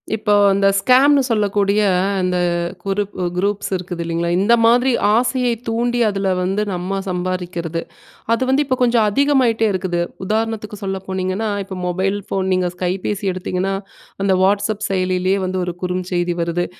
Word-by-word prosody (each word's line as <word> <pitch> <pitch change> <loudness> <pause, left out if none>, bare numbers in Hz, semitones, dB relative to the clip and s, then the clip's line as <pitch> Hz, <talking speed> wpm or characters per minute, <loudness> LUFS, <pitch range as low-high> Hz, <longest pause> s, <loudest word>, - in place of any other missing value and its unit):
இப்போ 210 -1 0 0.2
அந்த 195 0 +2
ஸ்கேம்ன்னு 270 +6 +5
சொல்லக்கூடிய 205 -2 +1 0.4
அந்த 180 0 0 0.5
குரூப்பு 195 -2 -2
குரூப்ஸ் 200 +2 -1
இருக்குது 180 -1 -5
இல்லைங்களா, 170 +1 -2
இந்த 205 +5 +3
மாதிரி 245 +3 +4 0.3
ஆசையை 250 0 +1 0.2
தூண்டி 240 +2 0
அதுல 195 -2 -1
வந்து 190 +3 0
நம்ப 185 +2 -3
சம்பாரிக்கிறது, 180 -2 -3 0.5
அது 230 - +1
வந்து 265 +3 +3
இப்போ 260 -2 0
கொஞ்சம் 235 -3 +3
அதிகமாயிட்டே 255 -3 +2
இருக்குது. 185 -2 -1 0.2
உதாரணத்துக்கு 215 0 -2
சொல்ல 195 -1 -2
போனீங்கன்னா, 190 +3 -2 0.2
இப்போ 190 -1 -7
மொபைல் 190 +3 0
ஃபோன் 190 -1 -1
நீங்க 185 -1 +1
கைபேசி 185 +3 -2
எடுத்தீங்கன்னா, 185 +1 -2 0.5
அந்த 195 -1 +3
வாட்ஸ்அப் 205 +2 +1
செயலியிலயே 185 0 +1
வந்து 185 0 -2
ஒரு 175 -1 -4
குறுஞ்செய்தி 180 -1 -1
வருது. 170 +1 -1
195 Hz, 140 wpm, -19 LUFS, 180-220 Hz, 0.5 s, ஸ்கேம்ன்னு